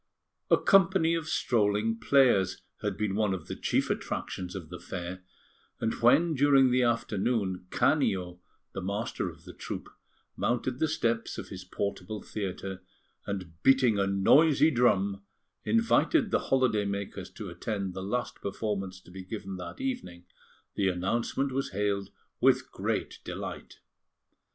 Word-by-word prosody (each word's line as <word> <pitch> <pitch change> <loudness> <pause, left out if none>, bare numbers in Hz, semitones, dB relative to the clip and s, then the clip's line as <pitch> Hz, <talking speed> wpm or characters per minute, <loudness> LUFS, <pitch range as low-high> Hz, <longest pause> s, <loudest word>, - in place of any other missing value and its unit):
A - - +6
company 190 -4 +4
of 165 -1 -2
strolling 110 -2 +1
players 120 -9 +3 0.2
had - - -2
been 105 -2 -1
one 105 -2 +1
of 90 - -8
the - - -5
chief - - 0
attractions 90 0 -4
of 85 -5 -7
the 90 -1 -8
fair; 90 +1 -6 0.6
and 115 0 0
when 145 +8 +5
during 135 -2 +5
the 125 +1 +3
afternoon, 105 -5 0
Canio, 90 -2 +1 0.3
the 95 - -4
master 100 +5 -2
of - - -14
the - - -11
troupe, - - -6 0.5
mounted 125 +1 -1
the 160 - +2
steps 115 -7 -1
of - - -7
his 95 -1 -7
portable 100 +2 -4
theatre, 95 -2 -5 0.5
and, 90 -5 -5
beating 130 -6 +4
a 100 - +2
noisy 140 +11 +5
drum, 100 -6 +2 0.4
invited 230 +2 +3
the - - +3
holiday 125 -6 +3
makers 100 0 -4
to - - -7
attend 100 -4 -3
the 95 - -5
last 120 +5 -3
performance 95 -2 -3
to 90 - -16
be 95 +1 -8
given 95 -1 -6
that 90 -1 -8
evening, 250 - -4 0.5
the 100 - +1
announcement 115 +9 -1
was 135 -7 -2
hailed 100 0 -1 0.3
with - - +3
great - - -2
delight. - - -6
105 Hz, 145 wpm, -29 LUFS, 95-130 Hz, 0.6 s, A